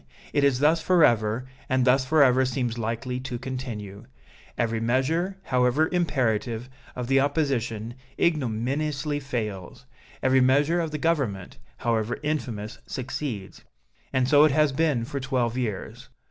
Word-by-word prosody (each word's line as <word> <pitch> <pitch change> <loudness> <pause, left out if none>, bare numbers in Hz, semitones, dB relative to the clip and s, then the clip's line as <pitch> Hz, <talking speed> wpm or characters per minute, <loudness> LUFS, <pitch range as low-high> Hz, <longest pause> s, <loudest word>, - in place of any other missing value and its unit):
It 145 - +2
is 140 -3 +4
thus 155 +4 +3
forever, 125 - +3 0.2
and 130 -1 +2
thus 130 +1 +4
forever 130 -3 +4
seems 125 -2 -2
likely 115 +3 -3
to 130 -1 -5
continue. 120 -6 -6 0.5
Every 115 -1 0
measure, 145 +11 0
however 125 +5 +2
imperative, 125 - 0 0.2
of 125 - -3
the 135 +2 +3
opposition, 130 -6 -1 0.3
ignominiously 145 +1 0
fails 115 -5 -5 0.4
every 130 0 +4
measure 145 +6 +3
of 165 - -2
the 155 - -4
Government, 135 - -1 0.2
however 115 -1 -1
infamous, 120 -9 -3
succeeds. 125 -5 -5 0.5
And 130 -1 +1
so 145 +2 +6
it 155 - +5
has 150 0 +3
been 140 -4 +1
for 140 +3 -4
twelve 125 -3 -1
years. 115 -6 -4
130 Hz, 135 wpm, -26 LUFS, 115-145 Hz, 0.5 s, so